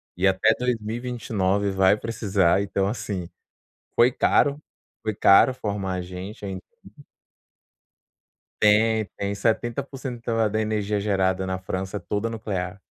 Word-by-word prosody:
e 95 +2 +2
até 95 0 +4
2029 110 -4 -1
vai 95 +1 +4
precisar, 100 -5 +1
então 100 -1 -1
assim, 100 -5 -4 0.7
foi 120 +2 +5
caro 145 +3 +2 0.4
foi 110 -1 -1
caro 100 +7 +6
formar 100 -5 -3
a 90 - -3
gente 95 +4 -8
em 95 -1 -4 2.0
Tem, 110 0 +4
tem 100 0 -2
70% 120 +4 -2 0.3
da 110 +1 0
energia 105 -1 -1
gerada 95 -2 0
na 95 0 -2
França 95 +1 -4
é - - -4
toda 105 +5 -2
nuclear. 100 -5 -4
100 Hz, 120 wpm, -24 LUFS, 95-115 Hz, 2.0 s, caro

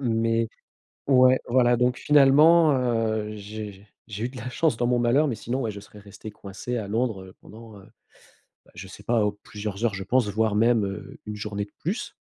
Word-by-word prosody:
Mais 115 -2 0 0.6
ouais, 130 -1 +5
voilà, 120 -1 +3
donc, 125 +1 +1
finalement, 150 +3 +5
heu, 115 -4 -1
j'ai 105 -1 -9 0.2
j'ai 105 +2 -5
eu - - -1
de 130 - -13
la 125 +3 -6
chance 150 -2 0
dans 120 - 0
mon 120 0 +2
malheur, 130 +6 +2
mais, 120 - -2
sinon, 130 +5 -3
ouais, 110 - -2
je 100 - -9
serais 105 +1 -15
resté 105 +1 -11
coincé 105 +5 -7
à 100 -3 -5
Londres, 110 -3 -1
heu, 95 - -14
pendant, 110 -2 -13
heu, 95 - -15 0.8
bah, - - -23
je - - -9
sais - - -12
pas, 115 -3 +2
oh, 105 0 -4
plusieurs 105 +1 -6
heures, 115 - +2
je 95 0 -5
pense, 125 -2 +2
voire 110 0 0
même, 115 -1 +3
heu, 100 +1 -8
1 105 - -5
journée 105 -1 -4
de - - -28
plus. 190 +9 -4
115 Hz, 210 wpm, -25 LUFS, 105-125 Hz, 0.8 s, ouais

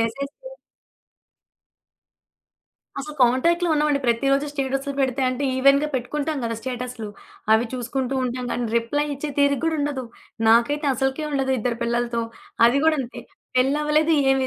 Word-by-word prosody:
Message 275 +5 -2
చేయదు. - - -12 2.4
అసలు 300 +2 -7
కాంటాక్ట్‌లో 335 +8 +3
ఉన్నామండి. 295 -1 +2
ప్రతిరోజు 275 +4 +2
స్టేటస్లు 275 0 -2
పెడితే 265 0 0
అంటే, 255 +2 -2
ఈవెన్‌గా 275 +3 +4
పెట్టుకుంటాం 295 +4 -2
కదా 230 0 -2
స్టేటస్లు. 250 -3 -5 0.4
అవి 220 +2 +4
చూసుకుంటూ 255 +1 -2
ఉంటాం 250 0 -3
గానీ, 245 - -2
రిప్లై 290 +6 0
ఇచ్చే 285 +2 -5
తీరిక 280 -2 +3
గూడా 325 -1 +1
ఉండదు. 285 -3 -2 0.4
నాకైతే 260 +6 +3
అసలుకే 270 +4 -1
ఉండదు 270 -1 0
ఇద్దరు 235 +1 -2
పిల్లలతో. 235 0 0 0.4
అది 245 +4 +3
కూడా 320 -1 +4
అంతే 245 -2 -7 0.4
పెళ్లి 265 +3 +3
అవ్వలేదు, 305 +2 +2 0.2
ఏమీ 265 -1 +2
270 Hz, 135 wpm, -23 LUFS, 245-290 Hz, 2.4 s, ఈవెన్‌గా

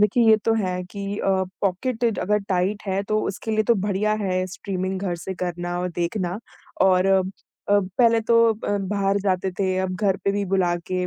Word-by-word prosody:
देखिए, 210 +3 +3
ये 220 - +7
तो 225 - +3
है 185 -4 -1
कि 200 +2 -5
अ, - - -1 0.3
पॉकेट 225 +4 0
अगर 210 +2 +1
टाइट 190 +2 0
है 195 +1 0
तो 215 +1 0
उसके 200 +3 -4
लिए 215 0 +2
तो 235 - +4
बढ़िया 205 +1 0
है 185 -1 0
स्ट्रीमिंग 185 0 -4
घर 190 -3 -1
से 190 +3 -6
करना 175 -1 -3
और 180 - -1
देखना 175 +2 -2 0.4
और 185 0 +4
अ, 195 0 +4 0.5
पहले 205 +4 +3
तो 230 +1 +3
अ, 205 -1 -2
बाहर 195 0 0
जाते 190 -1 0
थे 190 -2 +1
अब 185 -1 -1
घर 195 -1 +1
पे 200 - +2
भी 200 0 -1
बुला 175 -2 +2 0.2
के 180 0 0
195 Hz, 195 wpm, -23 LUFS, 185-210 Hz, 0.5 s, ये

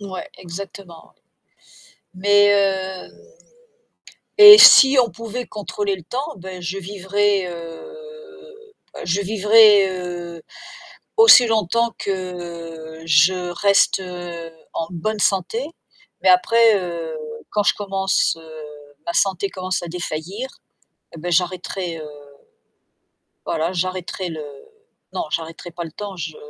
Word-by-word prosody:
Ouais, 195 -2 -8
exactement. 180 0 -10 1.0
Mais 205 +2 +4
heu 190 -2 -1 1.3
et 420 0 +11
si 270 -7 +8
on 235 -2 0
pouvait 230 +2 -7
contrôler 205 -1 -4
le 185 - -10
temps, 270 - -5
bah, 185 0 -9
je 175 +2 -5
vivrais, 200 +1 -1
heu, 445 - -12 0.2
bah, - - -11
je 175 +4 -1
vivrais, 210 0 +5
heu, 175 -2 -7 0.7
aussi 445 - +8
longtemps 225 +1 0
que 170 -4 -7
je 160 +4 +4 0.2
reste 195 +1 +2 0.7
en 165 - -3
bonne 215 +5 -4
santé. 200 +7 -1 0.6
Mais - - +2
après, 230 - +4
heu, 170 -3 -6 0.3
quand 210 - 0
je - - +3
commence, 195 -3 -1
heu, - - -15 0.6
ma 170 - -2
santé 195 0 0
commence 185 -1 -4
à 175 - -7
défaillir 180 +7 -6 0.7
et - - -10
bah, 175 +3 -6
j'arrêterai, 180 0 -2
heu, 155 -1 -9 1.4
voilà, 165 +2 -2
j'arrêterai 185 0 -4
le 155 -2 -7 0.7
non, - - -2
j'arrêterai 165 +2 -5
pas 170 0 -6
le 160 - -10
temps, 200 +1 -8
je 160 -2 -6
190 Hz, 120 wpm, -20 LUFS, 175-210 Hz, 1.4 s, et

